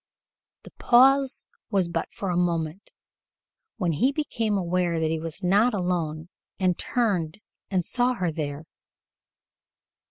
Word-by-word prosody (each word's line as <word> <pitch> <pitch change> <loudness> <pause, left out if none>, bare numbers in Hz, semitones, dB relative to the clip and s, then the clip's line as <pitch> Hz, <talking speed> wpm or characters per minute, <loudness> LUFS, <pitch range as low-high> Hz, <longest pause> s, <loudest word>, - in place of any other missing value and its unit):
The - - -13
pause 270 +2 +4 0.2
was 195 -4 +1
but 170 -1 -3
for 195 -2 -4
a - - -1
moment, 170 0 -1 0.9
when 180 -6 0
he 245 - +2
became 230 -8 -1
aware 175 -2 0
that 160 0 0
he 160 - -1
was 165 +4 -6
not 205 +6 +3
alone 170 -4 -2 0.3
and 185 -2 +2
turned 195 -10 -1 0.3
and 185 -3 0
saw 250 +4 +1
her 180 -8 -1
there. 150 -1 -5
180 Hz, 130 wpm, -25 LUFS, 165-220 Hz, 0.9 s, pause